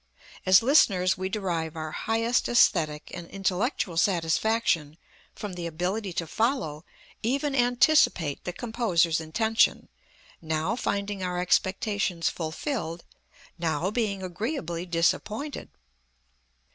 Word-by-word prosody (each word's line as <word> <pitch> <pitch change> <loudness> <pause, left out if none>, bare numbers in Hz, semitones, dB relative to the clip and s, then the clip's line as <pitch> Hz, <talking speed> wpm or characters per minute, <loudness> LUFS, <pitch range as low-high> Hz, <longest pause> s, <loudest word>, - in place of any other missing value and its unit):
As 185 +3 +7
listeners 195 -9 +4
we 190 0 -3
derive 170 -6 -2
our 155 -1 -5
highest 230 +5 0
æsthetic 155 -10 +3
and 175 -2 -7
intellectual 195 - -1
satisfaction 165 -2 +1 0.4
from 205 -3 -6
the 175 -1 -4
ability 185 +5 -2
to 165 - -2
follow, 165 - -1 0.4
even 275 +5 0
anticipate, 245 - +3
the 180 - -3
composer's 180 -8 +1
intention, 220 +8 +1 0.5
now 160 +5 -1
finding 200 -4 -2
our 180 -1 -2
expectations 190 -1 +1
fulfilled, 170 - -4 0.6
now 170 +3 0
being 210 -4 -1
agreeably 180 - -4
disappointed. 210 - -1
185 Hz, 105 wpm, -27 LUFS, 165-225 Hz, 0.6 s, As